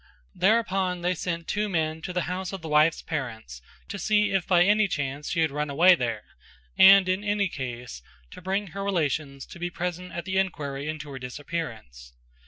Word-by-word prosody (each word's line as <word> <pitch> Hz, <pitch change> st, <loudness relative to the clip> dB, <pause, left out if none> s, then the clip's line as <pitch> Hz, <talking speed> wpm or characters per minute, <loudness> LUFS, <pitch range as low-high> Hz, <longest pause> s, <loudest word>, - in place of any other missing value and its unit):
Thereupon 190 Hz, -4 st, +1 dB
they 180 Hz, +1 st, +1 dB
sent 170 Hz, -1 st, -4 dB
two 210 Hz, 0 st, -1 dB
men 160 Hz, -3 st, -1 dB
to 180 Hz, -, -5 dB
the 180 Hz, -1 st, -1 dB
house 180 Hz, +1 st, -4 dB
of 195 Hz, -4 st, -7 dB
the -, -, -5 dB
wife's 155 Hz, +2 st, +3 dB
parents 110 Hz, -, -5 dB, 0.3 s
to 200 Hz, -, -6 dB
see 210 Hz, +1 st, +2 dB
if 195 Hz, -3 st, 0 dB
by 175 Hz, -2 st, +5 dB
any 210 Hz, +2 st, +3 dB
chance 145 Hz, -3 st, -3 dB
she 165 Hz, -, 0 dB
had 160 Hz, -3 st, +2 dB
run 150 Hz, +1 st, -2 dB
away 170 Hz, +6 st, +6 dB
there 115 Hz, -8 st, -2 dB, 0.5 s
and 195 Hz, 0 st, +8 dB
in 185 Hz, +2 st, 0 dB
any 205 Hz, -1 st, +1 dB
case 125 Hz, -, -6 dB, 0.3 s
to -, -, -11 dB
bring 195 Hz, +2 st, -2 dB
her 195 Hz, 0 st, -4 dB
relations 150 Hz, -7 st, -1 dB
to -, -, -12 dB
be 175 Hz, 0 st, -2 dB
present 180 Hz, +1 st, -4 dB
at 170 Hz, 0 st, -5 dB
the 190 Hz, 0 st, 0 dB
enquiry 145 Hz, -6 st, -3 dB
into 155 Hz, -2 st, -6 dB
her 135 Hz, -, -7 dB
disappearance. 125 Hz, -, -6 dB
170 Hz, 190 wpm, -26 LUFS, 145-190 Hz, 0.5 s, and